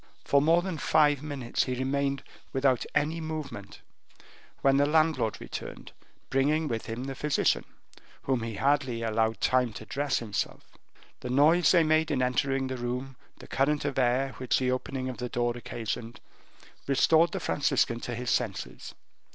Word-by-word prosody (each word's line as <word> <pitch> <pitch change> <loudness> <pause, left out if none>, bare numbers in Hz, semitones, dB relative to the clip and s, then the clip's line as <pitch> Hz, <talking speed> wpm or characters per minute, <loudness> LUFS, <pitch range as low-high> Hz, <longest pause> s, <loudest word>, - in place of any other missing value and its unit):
For 140 - +4
more 165 +4 +4
than 180 -5 -4
five 145 -2 +3
minutes 140 -5 -2
he 130 - -2
remained 140 +1 -1 0.3
without 135 -2 +2
any 160 +3 +1
movement, 155 -11 -6 0.8
when 135 0 +4
the 145 +1 +3
landlord 155 -7 +2
returned, - - -8 0.4
bringing 150 +4 +2
with 115 -4 -3
him 115 +3 -4
the 135 0 -4
physician, 150 +2 +1 0.6
whom 130 -3 0
he 115 -1 -4
hardly 135 -2 +1
allowed 110 0 0
time 125 -3 +2
to 110 - -9
dress 140 +2 -1
himself. 105 -5 -3 0.6
The 125 - -6
noise 150 +7 +5
they 170 -3 +5
made 155 0 +2
in 135 -4 +1
entering 135 +1 0
the 130 0 -4
room, 125 +2 -4 0.2
the - - -12
current 145 +2 +1
of 140 -2 -1
air, 130 +2 +2
which 130 -1 +1
the 130 -1 +1
opening 130 0 -3
of 130 - -5
the 125 0 -3
door 120 0 0
occasioned, 115 -1 -5 0.7
restored 160 +4 +4
the 195 - -3
Franciscan 135 -7 +1
to 120 0 -5
his 125 +1 -2
senses. 110 -6 -3
135 Hz, 160 wpm, -28 LUFS, 120-145 Hz, 0.8 s, noise